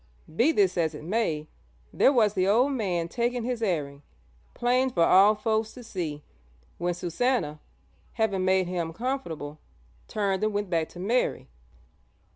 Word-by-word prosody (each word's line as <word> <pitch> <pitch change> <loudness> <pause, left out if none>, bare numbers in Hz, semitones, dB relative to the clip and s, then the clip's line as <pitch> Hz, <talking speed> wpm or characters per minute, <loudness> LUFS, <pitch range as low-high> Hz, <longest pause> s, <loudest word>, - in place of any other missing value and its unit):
Be 250 - +4
this 190 - +2
as 160 -2 0
it 150 - -9
may, 165 -5 -1 0.5
there - - +5
was 220 -6 +3
the 185 -2 +1
old 245 +8 +3
man 185 -10 -1
taking 240 +5 -1
his 245 -1 -3
airing, 145 -9 -2 0.5
'plain 250 +2 +2
for 175 -9 +2
all 195 +5 +6
folks 220 +1 -1
to 250 - -11
see,' 165 -9 -5 0.6
when 175 0 -1
Susannah, 175 - -1 0.5
having 205 -5 0
made 185 0 +3
him 170 -2 -3
comfortable, 165 - -4 0.5
turned 200 -2 -1
and 215 0 +1
went 205 -2 -2
back 165 -2 0
to 175 - -12
Mary. 225 - 0
195 Hz, 150 wpm, -27 LUFS, 170-235 Hz, 0.6 s, all